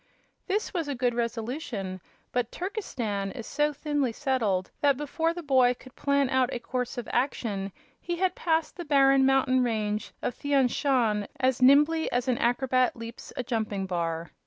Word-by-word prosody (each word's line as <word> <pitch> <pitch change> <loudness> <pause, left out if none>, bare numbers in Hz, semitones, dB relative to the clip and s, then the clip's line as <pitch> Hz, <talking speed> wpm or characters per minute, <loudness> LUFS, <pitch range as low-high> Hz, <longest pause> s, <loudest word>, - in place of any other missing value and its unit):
This 410 +3 -1
was 335 -5 -2
a 285 - -2
good 245 -1 +1
resolution, 230 - -3 0.3
but 245 -1 -1
Turkestan 235 - -3
is 230 - -7
so 295 +1 +1
thinly 290 -3 -1
settled 225 -8 0
that 280 -2 +4
before 320 +3 -1
the 345 0 -6
boy 260 -4 +4
could 255 +1 -16
plan 280 -1 +2
out 260 0 +2
a - - -2
course 250 +1 -4
of 245 - -4
action 215 -6 -1 0.3
he 345 - -3
had 365 +1 +1
passed 325 -1 0
the 350 - -4
barren 275 -3 +4
mountain 265 -1 +3
range 215 -3 -1
of - - -1
Thian 280 -3 +2
Shan 230 -8 +1
as 260 -1 +1
nimbly 295 +5 +5
as 245 +1 0
an 250 -2 +1
acrobat 255 +1 +2
leaps 230 +1 -9
a 255 - -1
jumping 215 -5 -2
bar. 170 -3 -3
255 Hz, 170 wpm, -27 LUFS, 230-285 Hz, 0.3 s, nimbly